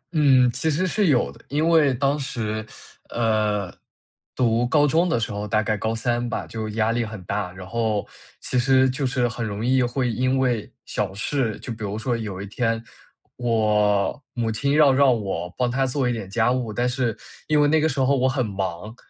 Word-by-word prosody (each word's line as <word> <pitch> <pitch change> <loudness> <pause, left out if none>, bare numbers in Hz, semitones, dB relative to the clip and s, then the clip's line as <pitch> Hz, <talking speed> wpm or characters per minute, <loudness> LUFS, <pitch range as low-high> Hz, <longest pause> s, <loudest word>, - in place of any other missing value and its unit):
嗯， 135 -5 +5
其 130 +6 -1
实 160 +5 +1
是 195 +2 +1
有 130 -5 +2
的。 - - -17
因 150 +4 +1
为 160 -4 +5
当 140 +3 0
时， 110 -6 -3 0.5
呃， 105 -4 0 0.6
读 120 -1 +2
高 145 +2 +4
中 165 +5 +2
的 120 - +1
时 115 - -2
候， 105 +1 -4
大 110 +1 +1
概 110 0 0
高 110 +1 -2
3 120 +1 -1
吧， - - -3
就 110 -1 -5
压 110 +1 0
力 120 0 0
很 110 -3 -7
大。 100 0 -3
然 95 0 -10
后 110 -2 -1 0.3
其 125 - -1
实 130 +1 +4
就 130 +1 -1
是 125 -1 +1
很 115 0 -4
容 105 0 -3
易 130 +1 +3
会 125 +1 0
因 130 +3 +1
为 125 -5 0
小 - - -2
事 115 +1 -1
就 120 - -6
比 110 -1 -9
如 100 0 -3
说 120 +2 -1
有 105 -5 -5
一 100 - -5
天 115 +2 -1 0.5
我 105 0 +1
母 115 -2 -1
亲 140 +6 0
要 150 -2 +6
让 130 -3 +4
我 90 -4 -3
帮 125 -1 +1
她 135 +2 +1
做 130 0 0
一 120 - +1
点 110 -5 -6
家 110 +4 +2
务， 125 -3 -1
但 120 +3 0
是 125 -3 -1 0.3
因 150 -1 +3
为 145 - +4
那 155 +1 +3
个 160 - +2
时 140 -2 -3
候 135 +1 +3
我 130 0 +2
很 130 -2 0
忙， 100 +1 -4
120 Hz, 225 characters per minute, -23 LUFS, 110-130 Hz, 0.6 s, 要